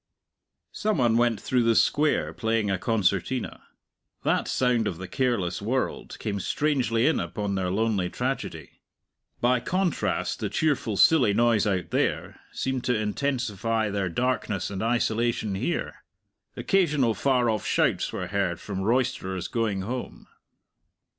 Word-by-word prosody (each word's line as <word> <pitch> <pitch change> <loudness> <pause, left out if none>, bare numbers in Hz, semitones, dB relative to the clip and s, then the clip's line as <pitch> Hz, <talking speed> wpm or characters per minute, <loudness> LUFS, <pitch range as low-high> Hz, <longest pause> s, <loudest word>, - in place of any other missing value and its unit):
Some 215 -3 -1
one 120 -3 +3
went 120 -2 +2
through 125 -1 +1
the 115 -1 +3
Square 150 +5 +2
playing 110 -3 0
a 95 - -1
concertina. 110 +3 0 0.6
That - - +1
sound 120 -4 +1
of 85 - -3
the 95 +1 -7
careless 110 -6 -1
world 125 +6 -2
came 100 -2 -3
strangely 125 -2 +1
in 160 - +3
upon 105 -2 -3
their 95 -2 -1
lonely 100 -2 0
tragedy. - - -4 0.6
By 125 +1 +3
contrast 180 +6 -1
the - - -2
cheerful, 140 -9 0
silly 125 -9 +5
noise 115 -2 +3
out 90 -4 -1
there - - -1
seemed 130 -1 -2
to 125 -3 +2
intensify 115 -2 -1
their 100 -2 -1
darkness 105 -2 -1
and 95 -1 -4
isolation 115 -2 0
here. 125 - -3 0.5
Occasional 150 - +2
far 125 +3 +1
off 110 -3 0
shouts - - +1
were 90 - -4
heard 90 -2 -1
from 95 -2 -5
roisterers 105 -5 0
going 110 -5 -1
home. 125 +6 -5
115 Hz, 135 wpm, -26 LUFS, 100-125 Hz, 0.6 s, silly